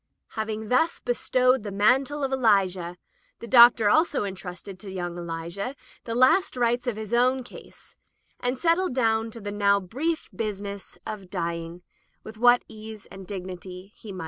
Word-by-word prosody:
Having 220 Hz, -1 st, -4 dB
thus 320 Hz, +7 st, +2 dB
bestowed 255 Hz, +1 st, +1 dB
the 205 Hz, -, -6 dB
mantle 260 Hz, +9 st, +2 dB
of 270 Hz, -, -1 dB
Eli 220 Hz, -7 st, +4 dB
jah, 180 Hz, -1 st, -6 dB, 0.4 s
the -, -, -9 dB
Doctor 235 Hz, -2 st, +7 dB
also 310 Hz, +5 st, +3 dB
entrusted 190 Hz, -1 st, -7 dB
to 195 Hz, -, -9 dB
young 175 Hz, -2 st, -4 dB
Elisha 170 Hz, +8 st, -5 dB, 0.3 s
the 230 Hz, -, -3 dB
last 255 Hz, +7 st, +4 dB
rites 240 Hz, +1 st, +1 dB
of 240 Hz, -, 0 dB
his 220 Hz, +1 st, -6 dB
own 255 Hz, +2 st, +3 dB
case, -, -, -14 dB, 0.4 s
and 250 Hz, +1 st, -1 dB
settled 335 Hz, -1 st, +1 dB
down 225 Hz, -3 st, +1 dB
to 230 Hz, -, -9 dB
the 205 Hz, -1 st, -5 dB
now 200 Hz, -1 st, +3 dB
brief 285 Hz, -, -3 dB
business 200 Hz, -2 st, -5 dB
of 200 Hz, -4 st, -7 dB
dy 170 Hz, -3 st, -2 dB
ing 170 Hz, +1 st, -7 dB, 0.4 s
with 220 Hz, 0 st, -10 dB
what 245 Hz, +1 st, +5 dB
ease 215 Hz, -1 st, -10 dB
and 190 Hz, -1 st, -10 dB
dignity 185 Hz, 0 st, -8 dB
he 215 Hz, -, -10 dB
might. 190 Hz, -, -7 dB
215 Hz, 170 wpm, -26 LUFS, 190-245 Hz, 0.4 s, Doctor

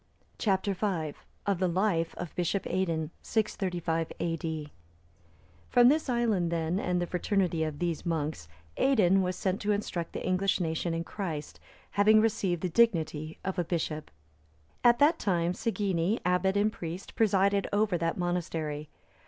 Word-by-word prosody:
Chap. 190 Hz, -3 st, +1 dB
V. 190 Hz, -6 st, -1 dB, 0.3 s
Of 200 Hz, -3 st, +1 dB
the 185 Hz, -, +2 dB
life 170 Hz, -2 st, 0 dB
of 175 Hz, -2 st, -6 dB
Bishop 180 Hz, +3 st, -1 dB
Aidan. 165 Hz, -4 st, -1 dB
[635 175 Hz, -6 st, -1 dB
A.D.] 160 Hz, -2 st, -3 dB, 1.0 s
From 245 Hz, 0 st, +6 dB
this 305 Hz, 0 st, +1 dB
island, 220 Hz, -8 st, +1 dB
then, 165 Hz, +2 st, 0 dB
and 180 Hz, -3 st, 0 dB
the 175 Hz, -, 0 dB
fraternity 180 Hz, -2 st, 0 dB
of 155 Hz, -2 st, -3 dB
these 170 Hz, -1 st, -2 dB
monks, 155 Hz, -, -2 dB, 0.3 s
Aidan 195 Hz, -8 st, +4 dB
was 180 Hz, 0 st, -1 dB
sent 190 Hz, +1 st, -1 dB
to 210 Hz, -, +1 dB
instruct 195 Hz, -5 st, -2 dB
the -, -, -4 dB
English 185 Hz, +2 st, +1 dB
nation 165 Hz, 0 st, -1 dB
in 165 Hz, -, -2 dB
Christ, 170 Hz, -6 st, -5 dB, 0.3 s
having 215 Hz, +2 st, +5 dB
received 200 Hz, -6 st, 0 dB
the -, -, +2 dB
dignity 160 Hz, -7 st, +1 dB
of 190 Hz, -1 st, -2 dB
a -, -, +2 dB
bishop. 155 Hz, -2 st, -3 dB, 0.7 s
At 240 Hz, 0 st, +6 dB
that 305 Hz, +5 st, +4 dB
time 175 Hz, -3 st, +1 dB
Segeni,(311) 195 Hz, -1 st, 0 dB
abbot 180 Hz, +2 st, +2 dB
and 210 Hz, +1 st, +2 dB
priest, 170 Hz, +3 st, -6 dB
presided 200 Hz, -2 st, +2 dB
over 205 Hz, -2 st, +2 dB
that 165 Hz, 0 st, -1 dB
monastery. 165 Hz, -4 st, -2 dB
180 Hz, 150 wpm, -29 LUFS, 165-200 Hz, 1.0 s, From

